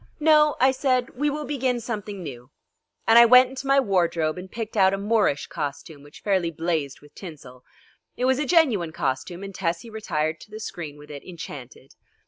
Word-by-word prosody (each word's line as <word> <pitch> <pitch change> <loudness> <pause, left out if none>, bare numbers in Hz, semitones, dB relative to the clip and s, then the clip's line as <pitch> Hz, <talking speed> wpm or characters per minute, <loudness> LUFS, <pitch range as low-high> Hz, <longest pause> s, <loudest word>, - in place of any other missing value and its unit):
"No," 300 -1 +5
I 260 +1 +5
said, 260 -2 0
"we 290 +4 -1
will 300 +1 -4
begin 260 -4 -1
something 210 -4 -5
new;" 125 -4 -9 0.6
and 225 +1 +7
I 235 - +9
went 250 +1 +7
into 265 +1 -7
my 275 0 +5
wardrobe 170 -8 +1
and 185 +1 -9
picked 225 -1 -6
out 190 -1 +4
a - - -5
Moorish 205 -8 +1
costume 145 0 -6
which 145 +1 -15
fairly 190 -4 +1
blazed 160 -4 -3
with 145 0 -18
tinsel. 130 -8 -11 0.5
It 250 - 0
was 260 +1 +2
a 295 - -1
genuine 240 - +3
costume, 145 +5 -3
and 195 0 -7
Tessie 180 +5 -3
retired 160 -8 -2
to - - -14
the 215 +1 -8
screen 160 -8 -7
with 150 0 -13
it 140 -1 -9
enchanted. 135 -7 -10
195 Hz, 190 wpm, -24 LUFS, 155-250 Hz, 0.6 s, I